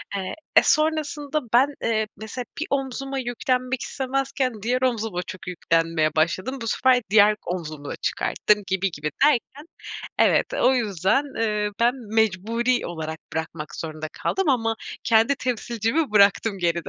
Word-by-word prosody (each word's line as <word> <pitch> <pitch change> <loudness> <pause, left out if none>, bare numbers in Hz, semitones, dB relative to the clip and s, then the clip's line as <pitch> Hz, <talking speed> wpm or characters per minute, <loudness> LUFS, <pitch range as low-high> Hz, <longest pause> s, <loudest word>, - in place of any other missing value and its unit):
Eee, 190 -2 -3 0.2
e, - - +8
sonrasında 305 -1 +1
ben, 255 +4 +6 0.2
eee, 220 -1 +1
mesela 220 +3 -6
bir 320 - -1
omzuma 270 0 -2
yüklenmek 255 +1 -1
istemezken 265 -3 -2
diğer 250 +4 0
omzuma 225 -7 0
çok 185 +1 -10
yüklenmeye 165 -3 0
başladım. 185 +11 0
Bu 230 - -4
sefer 255 +2 +3
diğer 210 0 +6
omzumu 155 -5 -5
da - - -4
çıkarttım, 210 -1 0
gibi 190 0 0
gibi 150 -1 -4
derken 290 +1 0 0.5
evet, - - +4
o 265 - +3
yüzden, 210 - +1 0.2
eee, 210 -2 0
ben 240 +1 +4 0.2
mecburi 225 +4 +1
olarak 160 -2 -5
bırakmak 160 -1 -5
zorunda 155 -1 -5
kaldım 385 -4 -1
ama 225 -4 +2 0.3
kendi 230 +3 +4
temsilcimi 245 +3 -1
bıraktım 200 0 +4
geride. 170 -2 -1
225 Hz, 140 wpm, -24 LUFS, 185-260 Hz, 0.5 s, e